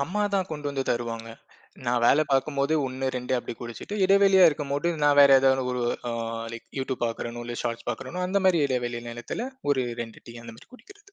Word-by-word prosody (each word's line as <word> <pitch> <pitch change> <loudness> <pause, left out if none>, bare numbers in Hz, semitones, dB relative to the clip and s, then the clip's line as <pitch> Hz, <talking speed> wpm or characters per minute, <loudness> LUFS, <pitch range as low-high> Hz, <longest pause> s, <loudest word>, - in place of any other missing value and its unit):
அம்மா 185 +9 -1
தான் 190 -1 0
கொண்டு 150 -2 -5
வந்து 135 -1 -2
தருவாங்க. 115 -1 -2 0.6
நா 120 - +1
வேல 140 +5 +5
பார்க்கும்போது 140 +2 +1
1, 130 +1 -2
2 125 +1 -1
அப்படி 120 - -6
குடிச்சுட்டு, 120 - -6
இடைவெளியா 195 -1 +6
இருக்கும்போது 145 +2 -2
நா 145 - +6
வேற 140 -1 +8
ஏதாவது 130 -1 +3
ஒரு 125 -1 -1 0.3
அ - - -3 0.4
லைக் 115 - -10
YouTube 130 -1 -3
பார்க்கிறனோ, 120 +1 -5
இல்ல 120 - -5
Shorts 115 -1 -3
பார்க்கறேனோ 135 +10 -4
அந்தமாரி 185 -3 +2
இடைவெளி 120 -3 -2
நேரத்துல 120 - -5 0.2
ஒரு 135 -2 +2 0.2
2 115 -1 -12
டீ, 120 - -10
அந்த 115 - -9
மாதிரி - - -18
குடிக்கிறது. 405 +7 -18
135 Hz, 185 wpm, -26 LUFS, 120-170 Hz, 0.6 s, வேற